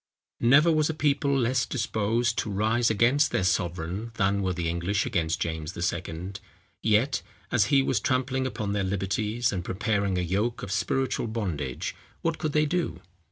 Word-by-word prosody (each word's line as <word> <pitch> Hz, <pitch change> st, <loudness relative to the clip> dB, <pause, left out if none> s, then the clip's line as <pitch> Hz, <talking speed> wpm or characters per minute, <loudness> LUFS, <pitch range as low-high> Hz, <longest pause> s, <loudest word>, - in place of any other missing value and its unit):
Never 140 Hz, +8 st, +5 dB
was 155 Hz, -1 st, +2 dB
a 160 Hz, -, -2 dB
people 140 Hz, -2 st, +2 dB
less 125 Hz, 0 st, +2 dB
disposed 115 Hz, -1 st, 0 dB
to -, -, -2 dB
rise 110 Hz, +4 st, +2 dB
against 125 Hz, +7 st, +3 dB
their 95 Hz, -, 0 dB
sovereign 90 Hz, +4 st, -1 dB
than 100 Hz, -1 st, +1 dB
were 95 Hz, -1 st, 0 dB
the 85 Hz, -2 st, -2 dB
English 85 Hz, +4 st, 0 dB
against 85 Hz, -9 st, 0 dB
James 80 Hz, +1 st, -3 dB
II. 85 Hz, +1 st, -3 dB, 0.5 s
Yet, 115 Hz, +5 st, +2 dB, 0.3 s
as 115 Hz, -4 st, +4 dB
he 135 Hz, +5 st, +4 dB
was 130 Hz, -5 st, +1 dB
trampling 130 Hz, +2 st, 0 dB
upon 105 Hz, -5 st, -3 dB
their 100 Hz, -1 st, 0 dB
liberties, 105 Hz, +5 st, 0 dB
and 90 Hz, -3 st, -3 dB
preparing 100 Hz, 0 st, 0 dB
a -, -, +1 dB
yoke 100 Hz, +7 st, -1 dB
of 100 Hz, -, -5 dB
spiritual 130 Hz, +4 st, 0 dB
bondage, 85 Hz, -, -3 dB, 0.3 s
what 165 Hz, -1 st, 0 dB
could 155 Hz, -2 st, -2 dB
they 150 Hz, 0 st, +3 dB
do? 175 Hz, +3 st, -1 dB
110 Hz, 165 wpm, -27 LUFS, 95-130 Hz, 0.5 s, Never